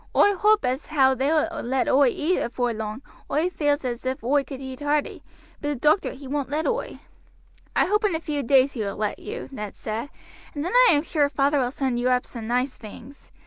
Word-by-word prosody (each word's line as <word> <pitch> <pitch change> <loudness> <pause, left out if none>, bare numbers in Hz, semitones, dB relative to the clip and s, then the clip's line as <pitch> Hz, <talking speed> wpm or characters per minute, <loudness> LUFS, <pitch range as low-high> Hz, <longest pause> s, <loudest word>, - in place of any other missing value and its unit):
Oi 410 - +5
hoap 420 -3 +3
as 255 +4 -2
how 270 -4 +4
they 265 +2 -1
will 325 +1 0
let 260 +1 0
oi 275 0 +5
eat 315 +9 0
afore 245 0 -1
long; 220 +3 -5 0.3
oi 325 +5 +1
feels 290 -4 0
as 240 -1 -3
if 260 -2 -3
oi 280 +4 +2
could 270 0 -8 0.2
hearty, 290 0 -1 0.4
but 290 - -3
the 290 - 0
doctor 305 +8 +2
he 270 0 -11
woin't 280 0 -2
let 305 +2 -1
oi." - - -2 0.8
"I - - +4
hope 420 +3 +1
in 390 -5 +1
a - - -1
few 300 -3 -3
days 270 +1 +4
he 235 - -4
will 200 -1 -3
let 210 0 -2
you," - - -6
Ned 210 -6 -6
said, 225 +6 -4 0.5
"and 290 +1 -3
then 360 - -3 0.2
I - - +6
am 290 0 +2
sure 295 -4 +1
father 285 0 +2
will 245 - 0
send 260 -2 -2
you 250 +1 +1
up 250 0 +2
some 230 -3 -8
nice 250 +3 0
things. 235 +5 -12
275 Hz, 225 wpm, -24 LUFS, 250-300 Hz, 0.8 s, I